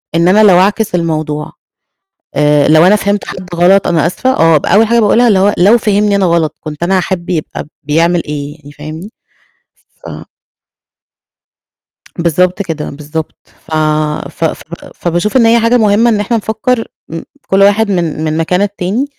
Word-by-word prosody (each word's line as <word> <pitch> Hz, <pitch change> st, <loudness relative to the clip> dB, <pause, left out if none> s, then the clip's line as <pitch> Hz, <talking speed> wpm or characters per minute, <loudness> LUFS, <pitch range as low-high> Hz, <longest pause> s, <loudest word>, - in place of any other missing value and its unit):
إن 170 Hz, +1 st, +2 dB
أنا 210 Hz, +4 st, +4 dB
لو 185 Hz, -4 st, +5 dB
أعكس 205 Hz, +1 st, 0 dB
الموضوع، 155 Hz, -3 st, -3 dB, 0.8 s
آآ، 150 Hz, -1 st, +2 dB
لو 160 Hz, +2 st, +5 dB
أنا 205 Hz, -, +5 dB
فهمت 200 Hz, -1 st, -2 dB
حد 185 Hz, 0 st, -8 dB
غلط 185 Hz, +3 st, +3 dB
أنا 165 Hz, -2 st, +1 dB
آسفة 255 Hz, +9 st, -2 dB
آه، 165 Hz, -8 st, +3 dB
ب 145 Hz, -, -4 dB
أول 220 Hz, +2 st, +3 dB
حاجة 235 Hz, +1 st, +2 dB
باقولها 230 Hz, +3 st, +3 dB
اللي 200 Hz, -4 st, +3 dB
هو 205 Hz, +2 st, +2 dB
لو 205 Hz, +7 st, +4 dB
فهمني 210 Hz, -2 st, +1 dB
أنا 200 Hz, -1 st, +1 dB
غلط، 170 Hz, -3 st, 0 dB
كنت 155 Hz, +1 st, -7 dB
أنا 190 Hz, +2 st, +1 dB
هاحب 180 Hz, -1 st, -3 dB
يبقى 160 Hz, -4 st, -4 dB, 0.2 s
بيعمل 165 Hz, +3 st, +1 dB
إيه، 145 Hz, 0 st, -6 dB
يعني 145 Hz, -2 st, -15 dB
فاهمني؟ 155 Hz, +7 st, -9 dB, 1.0 s
ف -, -, -8 dB, 2.1 s
بالضبط 180 Hz, +3 st, 0 dB
كده، 160 Hz, -5 st, -5 dB
بالضبط، 150 Hz, +2 st, -6 dB, 0.3 s
ف -, -, -10 dB, 0.6 s
ف 165 Hz, -, -6 dB
ف 160 Hz, -, -2 dB, 0.3 s
فباشوف 175 Hz, +7 st, -2 dB
إن 235 Hz, -3 st, +4 dB
هي 230 Hz, +1 st, +4 dB
حاجة 230 Hz, +2 st, +2 dB
مُهمة، 220 Hz, +1 st, +3 dB
إن 210 Hz, -2 st, 0 dB
إحنا 220 Hz, +3 st, -1 dB
نفكّر 225 Hz, +2 st, -2 dB, 0.2 s
م 165 Hz, 0 st, -6 dB, 0.2 s
كُلّ 195 Hz, +1 st, +2 dB
واحد 205 Hz, +2 st, +3 dB
من 170 Hz, -4 st, -2 dB
من 155 Hz, 0 st, -2 dB
مكان 180 Hz, +4 st, 0 dB
التاني، 205 Hz, +4 st, -2 dB
180 Hz, 170 wpm, -12 LUFS, 160-210 Hz, 2.1 s, لو